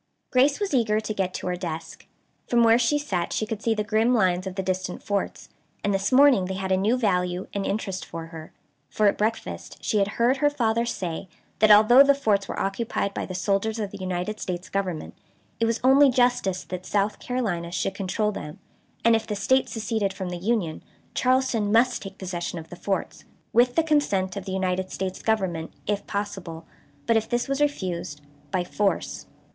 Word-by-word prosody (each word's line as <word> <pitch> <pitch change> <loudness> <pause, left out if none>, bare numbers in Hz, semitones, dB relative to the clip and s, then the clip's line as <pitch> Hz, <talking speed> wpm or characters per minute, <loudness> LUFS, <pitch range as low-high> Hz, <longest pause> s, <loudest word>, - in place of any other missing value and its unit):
Grace 275 +5 +3
was 405 -5 -2
eager 220 -4 +2
to 215 0 -4
get 190 -3 -1
to - - -6
her 180 0 -1
desk. 165 -3 -6 0.4
From 240 -1 +3
where 230 +1 +6
she 250 +5 +2
sat 190 -13 -2
she 215 - -1
could 220 -1 -5
see 225 0 +1
the 210 - -1
grim 225 +3 +2
lines 185 -3 +2
of 185 - -6
the 190 - -2
distant 185 0 -3
forts; 205 -1 -3 0.3
and 205 - +1
this 195 +3 0
morning 260 -7 +6
they 190 +1 -4
had 190 0 -3
a - - +5
new 210 +6 +2
value 180 -5 0
and 200 -1 -2
interest 195 -2 -2
for 165 0 -7
her; 160 -1 -9 0.4
for 215 - +1
at 200 - +4
breakfast 220 +2 -3
she 215 - +1
had 200 - +2
heard 245 +3 +3
her 290 +2 +3
father 235 -4 0
say 180 -4 -4 0.3
that, 215 - +5
although 215 +5 +8
the 280 0 +6
forts 210 -8 +1
were - - -4
occupied 200 0 -2
by - - -4
the 185 - -6
soldiers 200 +4 0
of 205 -3 -3
the - - -9
United 185 +3 -3
States 180 0 -4
Government, 185 -5 -3 0.5
it 230 - +2
was 230 0 0
only 270 +2 +6
justice 245 -7 +1
that 185 0 -6
South 205 0 0
Carolina 195 -10 -2
should 190 +2 -1
control 200 +2 -1
them, 150 -6 -7 0.5
and 230 0 +6
if 225 - -2
the 210 - -2
State 260 +6 +2
seceded 220 -3 -1
from 190 -1 -5
the 175 - -4
Union 185 -4 -1 0.3
Charleston 255 -5 +1
must 240 +3 +3
take 195 -1 -9
possession 175 -2 -4
of 165 0 -8
the - - -6
forts. 195 +2 -3 0.3
With 245 +1 +4
the 330 - +4
consent 210 -12 +1
of 200 -2 -5
the 190 - -5
United 185 0 -1
States 185 0 -4
Government 190 -7 -1
if 205 -1 -2
possible, 190 -5 -5 0.4
but, 230 - +3
if 220 - -2
this 240 0 0
was 275 +1 -1
refused, 180 - -2 0.3
by 185 -2 0
force. 200 +2 -2
205 Hz, 200 wpm, -25 LUFS, 185-230 Hz, 0.5 s, although